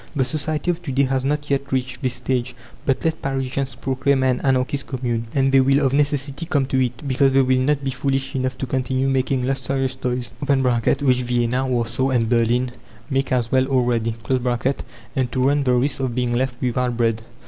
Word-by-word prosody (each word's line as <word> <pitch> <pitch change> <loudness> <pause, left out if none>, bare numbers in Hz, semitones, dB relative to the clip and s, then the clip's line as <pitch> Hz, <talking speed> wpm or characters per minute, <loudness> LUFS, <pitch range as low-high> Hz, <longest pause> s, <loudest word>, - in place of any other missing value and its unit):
The 135 -3 +2
society 155 +4 -1
of 175 0 -5
to 160 -6 -5
day 135 +2 +3
has 135 -1 0
not 145 +1 -1
yet 140 0 -1
reached 130 0 -2
this 130 -2 -1
stage. 125 0 -2 0.3
But 135 +2 0
let 160 -1 0
Parisians 135 -1 -2
proclaim 135 +1 0
an 130 -1 +1
Anarchist 135 +1 0
Commune, 120 -3 -2
and 135 -1 +3
they 135 0 +6
will 135 +2 +3
of 135 - +1
necessity 145 +2 0
come 145 -5 +1
to 130 0 +4
it, 125 +3 -4
because 135 0 +3
they 135 0 +5
will 130 0 +2
not 140 +2 +1
be 135 - -1
foolish 135 0 -1
enough 130 0 -1
to 135 - -3
continue 130 +1 -1
making 130 -1 +1
luxurious 135 0 -1
toys 125 -2 -3
(which 130 -1 +2
Vienna, 125 +1 0
Warsaw, 125 +1 0
and 120 -4 +1
Berlin 120 +2 +2 0.4
make 135 0 0
as 120 -2 0
well 130 0 +3
already), 120 -4 +1 1.0
and 130 -2 0
to 130 0 0
run 145 0 +2
the 125 - +3
risk 135 +4 +1
of 130 -3 -2
being 125 -1 0
left 125 +1 0
without 125 -1 -1
bread. 115 -2 +1
130 Hz, 195 wpm, -22 LUFS, 125-135 Hz, 1.0 s, they